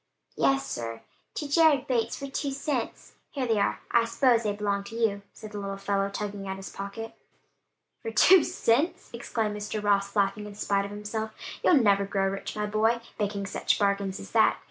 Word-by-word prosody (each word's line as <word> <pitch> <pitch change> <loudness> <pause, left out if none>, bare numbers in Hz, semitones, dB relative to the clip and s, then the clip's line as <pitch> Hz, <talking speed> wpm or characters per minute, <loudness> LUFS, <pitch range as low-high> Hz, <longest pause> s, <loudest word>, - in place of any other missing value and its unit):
"Yes, 270 0 +2
sir: 115 -1 -5 0.3
to 295 - -3
Jared 290 -3 +4
Bates, 230 -3 0
for 275 - -6
two 275 +1 -3
cents. 275 -3 -3 0.2
Here 270 -3 -3
they 225 -3 +1
are: - - 0
I 235 -1 +4
s'pose 235 0 +3
they 210 -2 0
belong 205 -1 -1
to 225 - -9
you," 220 -3 +1
said 215 - -11
the 205 - -5
little 195 -1 -4
fellow 195 0 0
tugging 200 -1 -5
at 190 0 -4
his 195 - -8
pocket. 200 +3 -6 0.9
"For 225 - -4
two 335 - +6
cents!" 275 +8 0
exclaimed 225 -2 -2
Mr. 210 +1 -4
Ross 200 0 +1
laughing 205 +1 +1
in 205 - -10
spite 200 -1 0
of - - -6
himself. 215 +1 -5 0.3
"You'll 355 - +6
never 200 -6 +4
grow 195 -1 +1
rich, 195 0 -5
my 210 0 -1
boy, 220 +3 +2 0.2
making 200 -1 -1
such 195 - 0
bargains 200 -1 0
as 95 - -10
that. - - +4
210 Hz, 190 wpm, -27 LUFS, 200-230 Hz, 0.9 s, two